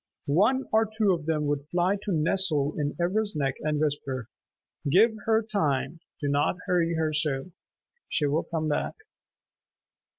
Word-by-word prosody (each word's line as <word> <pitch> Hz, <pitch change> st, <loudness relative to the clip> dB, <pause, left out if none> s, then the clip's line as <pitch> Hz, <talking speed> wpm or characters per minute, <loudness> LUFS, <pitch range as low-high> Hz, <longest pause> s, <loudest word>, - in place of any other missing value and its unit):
One 210 Hz, -, +2 dB
or 220 Hz, 0 st, +3 dB
two 210 Hz, -4 st, +4 dB
of 165 Hz, -3 st, -4 dB
them 155 Hz, -2 st, 0 dB
would 145 Hz, 0 st, -2 dB
fly 175 Hz, +4 st, +1 dB
to 205 Hz, 0 st, -5 dB
nestle 155 Hz, -3 st, +2 dB
in 145 Hz, -1 st, -1 dB
Ivra's 205 Hz, +3 st, 0 dB
neck 135 Hz, -3 st, 0 dB
and 150 Hz, -1 st, 0 dB
whisper, 140 Hz, -5 st, -2 dB, 0.6 s
"Give 215 Hz, +9 st, +5 dB
her 225 Hz, 0 st, +3 dB
time. 165 Hz, -, -1 dB, 0.2 s
Do 145 Hz, -, -2 dB
not 145 Hz, +4 st, +1 dB
hurry 170 Hz, -2 st, +1 dB
her 160 Hz, -1 st, 0 dB
so. 150 Hz, +1 st, -1 dB, 0.6 s
She 150 Hz, -, +1 dB
will 145 Hz, +3 st, +1 dB
come 160 Hz, -2 st, -3 dB
back." 150 Hz, -, -1 dB
160 Hz, 155 wpm, -27 LUFS, 145-190 Hz, 0.6 s, Give